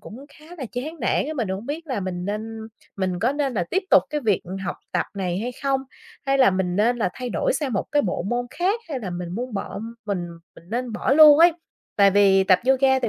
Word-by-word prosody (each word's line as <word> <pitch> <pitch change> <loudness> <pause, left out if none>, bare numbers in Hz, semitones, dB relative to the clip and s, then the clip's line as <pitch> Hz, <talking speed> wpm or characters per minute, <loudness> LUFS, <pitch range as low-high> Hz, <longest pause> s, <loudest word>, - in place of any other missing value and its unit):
cũng 255 +6 -11
khá 305 - -17
là 265 - -4
chán 300 +6 -5
nản - - +1
á, 310 - -3
mình 230 -7 -1
hổng 190 +4 -4
biết 320 +3 -5
là 260 -8 -2
mình 180 -2 -4
nên 215 +3 -4 0.4
mình 185 -2 -1
có 235 +8 +1
nên 280 -3 -1
là 180 - 0
tiếp 380 - +1
tục - - +7
cái 300 0 -1
việc 210 -7 +1 0.2
học - - -3 0.2
tập - - 0
này 185 -2 -2
hay 240 +4 -3
không? 275 -1 +1 0.5
Hay 275 0 +2
là 260 -6 +6
mình 185 -1 -1
nên 235 +4 +2
là 215 -6 0
thay 250 -1 -5
đổi - - 0
sang 290 - -2
một 200 - -1
cái 290 - +3
bộ 180 - -2
môn 245 0 -1
khác, 380 - 0
hay 275 -5 -4
là 195 -5 -5
mình 175 0 -5
buông 245 0 -4
bỏ 195 - -4 0.3
mình 180 -4 -2 0.3
mình - - -15
nên 245 0 -2
bỏ 250 - 0
luôn 300 0 +8
ấy. 340 +1 +7 0.4
Tại 200 -1 +6
vì 195 -1 +4
tập 185 -1 +5
yoga 265 0 +4
thì 240 - -1
240 Hz, 250 wpm, -23 LUFS, 195-275 Hz, 0.5 s, luôn